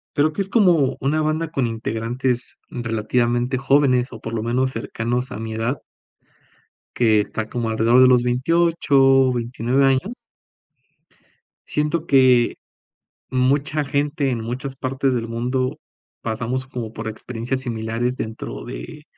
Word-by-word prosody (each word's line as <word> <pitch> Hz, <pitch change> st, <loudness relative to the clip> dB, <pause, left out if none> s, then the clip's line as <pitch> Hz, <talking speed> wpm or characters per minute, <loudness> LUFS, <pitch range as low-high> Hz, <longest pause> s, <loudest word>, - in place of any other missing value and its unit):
creo 150 Hz, +2 st, +3 dB
que 195 Hz, -, -1 dB
es 195 Hz, -, -7 dB
como 175 Hz, -, +3 dB
una 155 Hz, +4 st, +1 dB
banda 155 Hz, +1 st, -1 dB
con 135 Hz, -6 st, 0 dB
integrantes 115 Hz, +3 st, -2 dB
relativamente 120 Hz, +2 st, 0 dB
jóvenes, 135 Hz, -2 st, +2 dB
o 110 Hz, -, -9 dB
por 115 Hz, -, -6 dB
lo 110 Hz, -1 st, -2 dB
menos 130 Hz, +3 st, +1 dB
cercanos 120 Hz, +2 st, -3 dB
a 110 Hz, -, -6 dB
mi 110 Hz, -1 st, -5 dB
edad 115 Hz, +5 st, -1 dB, 1.2 s
que 110 Hz, -3 st, +4 dB
está 110 Hz, +1 st, -3 dB
como 120 Hz, -2 st, -2 dB
alrededor 115 Hz, +3 st, +4 dB
de -, -, +8 dB
los 125 Hz, -1 st, +5 dB
28, 135 Hz, -1 st, +3 dB
29 125 Hz, +2 st, 0 dB
años. 135 Hz, -, +2 dB, 1.6 s
Siento 150 Hz, +2 st, -1 dB
que 130 Hz, -3 st, +4 dB, 0.7 s
mucha 140 Hz, +4 st, +1 dB
gente 145 Hz, 0 st, 0 dB
en 120 Hz, -2 st, -2 dB
muchas 130 Hz, +3 st, -5 dB
partes 135 Hz, 0 st, -1 dB
del 115 Hz, -1 st, -2 dB
mundo 125 Hz, +2 st, -1 dB, 0.4 s
pasamos 120 Hz, +4 st, -2 dB
como 120 Hz, -4 st, -6 dB
por 110 Hz, 0 st, -5 dB
experiencias 120 Hz, +3 st, -4 dB
similares 115 Hz, +1 st, -2 dB
dentro 110 Hz, 0 st, -5 dB
de -, -, -8 dB
125 Hz, 135 wpm, -21 LUFS, 115-135 Hz, 1.6 s, de